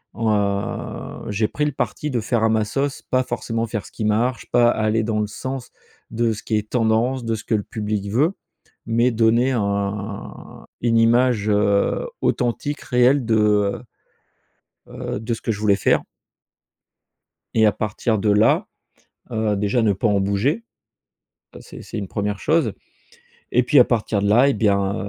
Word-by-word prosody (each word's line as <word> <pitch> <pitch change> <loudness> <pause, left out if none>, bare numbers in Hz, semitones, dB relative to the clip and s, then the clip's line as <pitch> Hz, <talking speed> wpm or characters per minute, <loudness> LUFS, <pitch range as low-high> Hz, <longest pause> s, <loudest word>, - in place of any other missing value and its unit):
Heu, 105 -3 -2
j'ai 105 +1 +1
pris 150 - -2
le 150 - 0
parti 150 +2 -3
de 120 - 0
faire 115 0 0
à 110 - +4
ma 110 -1 +1
sauce 135 +5 -2
pas 130 0 0
forcément 115 -2 -3
faire 110 -2 -4
ce - - -13
qui 110 - -4
marche, 115 +4 0
pas 120 -1 +5
aller 110 0 +1
dans 105 -1 -1
le 105 - -1
sens 130 +3 -6 0.4
de 115 -1 0
ce 105 - -9
qui 110 - 0
est 105 0 -4
tendance, 120 +2 +1
de 115 -1 0
ce 105 - -8
que 110 - +1
le 105 - -1
public 105 -2 -3
veut. 150 - +2 0.5
Mais 120 +2 +2
donner 115 +3 +3
un 100 -1 -4 0.2
une 115 -1 +2
image, 115 -1 +3
heu, 105 - +1
authentique 140 +4 -1
réelle 125 +1 +3
de, 110 -1 +2
heu, 105 -1 +2 1.1
heu, - - -5
de 115 +1 -3
ce - - -6
que 115 - -1
je 105 - -4
voulais 105 -2 +3
faire - - +2 1.5
et 110 -1 +4
à 105 - +4
partir 110 +1 -1
de 105 +1 +1
là, 105 +2 +3 0.6
heu, 110 -2 0
déjà 105 +4 +1
ne 105 -2 +3
pas 100 +4 -1
en 100 -1 +2
bouger. 105 - 0 0.9
Heu, - - -10
c'est - - -11
c'est - - -7
une 100 -3 -5
1re 105 -1 -2
chose. 155 -10 +1 0.8
Et 125 +1 +3
puis 130 +3 +5
à - - +9
partir 110 -3 0
de 100 - +1
là 120 +6 +5
et - - +2
bien, 100 -1 +1
110 Hz, 175 wpm, -21 LUFS, 105-120 Hz, 1.5 s, à